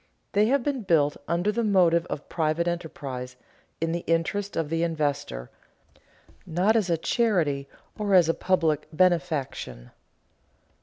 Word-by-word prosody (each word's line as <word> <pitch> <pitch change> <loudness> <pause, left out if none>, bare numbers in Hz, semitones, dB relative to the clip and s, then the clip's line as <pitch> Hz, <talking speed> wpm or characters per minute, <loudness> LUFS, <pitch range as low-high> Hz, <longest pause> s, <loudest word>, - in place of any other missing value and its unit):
They 210 +2 +3
have 275 +1 +2
been 280 -2 -1
built 155 -7 +2
under 175 +5 +1
the 235 +2 -1
motive 175 -5 +3
of 145 - -6
private 160 +1 0
enterprise, 135 -7 -5 0.4
in 165 0 -1
the 170 +1 -2
interest 180 +5 0
of 160 -3 -1
the 165 0 0
investor, 145 - -2 0.9
not 185 +7 +1
as 210 -5 +2
a 170 - +2
charity 160 - 0 0.3
or 205 -2 +2
as 175 -3 +6
a 165 - +3
public 165 -6 +1
benefaction. 155 - 0
170 Hz, 140 wpm, -26 LUFS, 150-190 Hz, 0.9 s, as